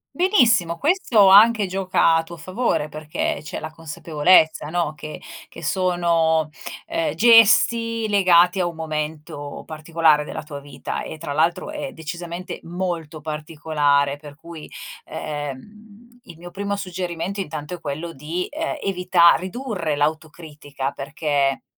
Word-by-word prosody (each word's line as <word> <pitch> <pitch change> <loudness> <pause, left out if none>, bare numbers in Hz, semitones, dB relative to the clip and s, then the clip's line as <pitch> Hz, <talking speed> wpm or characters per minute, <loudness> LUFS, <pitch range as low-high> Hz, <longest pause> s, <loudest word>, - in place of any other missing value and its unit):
Benissimo, 230 - +3
questo 270 - +3
anche 215 +2 +7
gioca 185 -3 +2
a 165 - +3
tuo 170 +1 -11
favore, 185 -1 -1
perché 155 -1 -3
c'è 150 - -6
la 155 +1 -7
consapevolezza 160 0 +2
no, 165 -1 -1
che 155 0 -9 0.3
che - - -12
sono, 165 -3 +1 0.3
ehm, 330 -1 -2
gesti 230 0 +5
legati 180 -3 +4
a 180 - +1
un 170 - -6
momento 155 -2 -5
particolare 155 -1 +2
della 150 - -7
tua 145 -1 -8
vita, 140 -1 -6
e - - -7
tra 150 -2 -5
l'altro 165 - 0
è 295 -3 -6
decisamente 170 +2 -7
molto 170 -3 -5
particolare. 150 -2 0
Per 145 -1 -12
cui, 165 0 -11 0.3
ehm, 210 - -8
il 170 - -13
mio 175 +1 -11
primo 200 +2 -3
suggerimento, 180 0 -4
intanto, 155 -4 -5
è 175 - -6
quello 155 +3 -5
di, 160 +6 -4
ehm, 320 +2 -3
evita 180 -2 +4
ridurre 185 - -3
l'autocritica, 150 -2 -3
perché 140 -1 -1
170 Hz, 130 wpm, -22 LUFS, 150-195 Hz, 0.3 s, anche